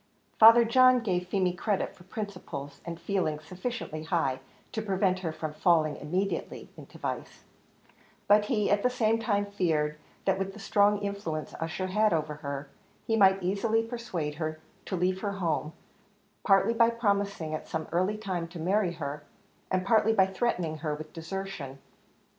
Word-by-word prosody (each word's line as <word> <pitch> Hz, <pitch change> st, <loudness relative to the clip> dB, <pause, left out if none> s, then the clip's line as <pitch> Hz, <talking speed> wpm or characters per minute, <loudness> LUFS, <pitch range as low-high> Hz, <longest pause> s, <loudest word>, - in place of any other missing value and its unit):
Father 230 Hz, +1 st, +9 dB
John 255 Hz, +1 st, +5 dB
gave 180 Hz, -5 st, -1 dB
Feemy 185 Hz, -1 st, +1 dB
credit 195 Hz, +2 st, -1 dB
for 175 Hz, -, -17 dB
principles 180 Hz, -9 st, -6 dB
and 170 Hz, -1 st, -6 dB
feelings 160 Hz, -6 st, -1 dB
sufficiently 185 Hz, -2 st, -5 dB
high 160 Hz, -5 st, 0 dB, 0.3 s
to 220 Hz, -, -2 dB
prevent 190 Hz, -2 st, +1 dB
her 170 Hz, -3 st, -3 dB
from 155 Hz, -1 st, -5 dB
falling 155 Hz, -2 st, +3 dB
immediately 185 Hz, +6 st, -3 dB
into -, -, -13 dB
vice, -, -, -5 dB, 0.8 s
but 210 Hz, 0 st, +5 dB
he 210 Hz, -4 st, +1 dB
at 205 Hz, 0 st, +3 dB
the 250 Hz, -, +3 dB
same 225 Hz, -3 st, +1 dB
time 205 Hz, -3 st, +1 dB
feared, 155 Hz, -7 st, 0 dB, 0.3 s
that 190 Hz, 0 st, +2 dB
with 195 Hz, 0 st, -3 dB
the 215 Hz, -, -11 dB
strong 205 Hz, 0 st, +3 dB
influence 200 Hz, -6 st, -4 dB
Ussher 165 Hz, +3 st, -2 dB
had 210 Hz, +2 st, +2 dB
over 155 Hz, -2 st, -1 dB
her, 140 Hz, -1 st, -5 dB, 0.4 s
he 225 Hz, -, +1 dB
might 195 Hz, -3 st, +5 dB
easily 215 Hz, +5 st, +1 dB
persuade 225 Hz, -10 st, -4 dB
her 155 Hz, 0 st, -2 dB, 0.3 s
to 190 Hz, -, -3 dB
leave 185 Hz, +1 st, 0 dB
her 205 Hz, -2 st, -2 dB
home, 165 Hz, -5 st, -1 dB, 0.7 s
partly 195 Hz, +3 st, +4 dB
by 230 Hz, 0 st, +5 dB
promising 200 Hz, -8 st, -1 dB
at 155 Hz, -, -5 dB
some 160 Hz, 0 st, -3 dB
early 185 Hz, +5 st, +1 dB
time 185 Hz, -5 st, -3 dB
to 170 Hz, +1 st, -10 dB
marry 185 Hz, +2 st, +1 dB
her, 150 Hz, -3 st, -5 dB, 0.5 s
and 185 Hz, 0 st, 0 dB
partly 220 Hz, +1 st, +4 dB
by 195 Hz, -3 st, +5 dB
threatening 180 Hz, -6 st, -1 dB
her 150 Hz, -1 st, -2 dB
with 155 Hz, +1 st, -9 dB
desertion. 165 Hz, -5 st, -6 dB
190 Hz, 165 wpm, -29 LUFS, 160-210 Hz, 0.8 s, Father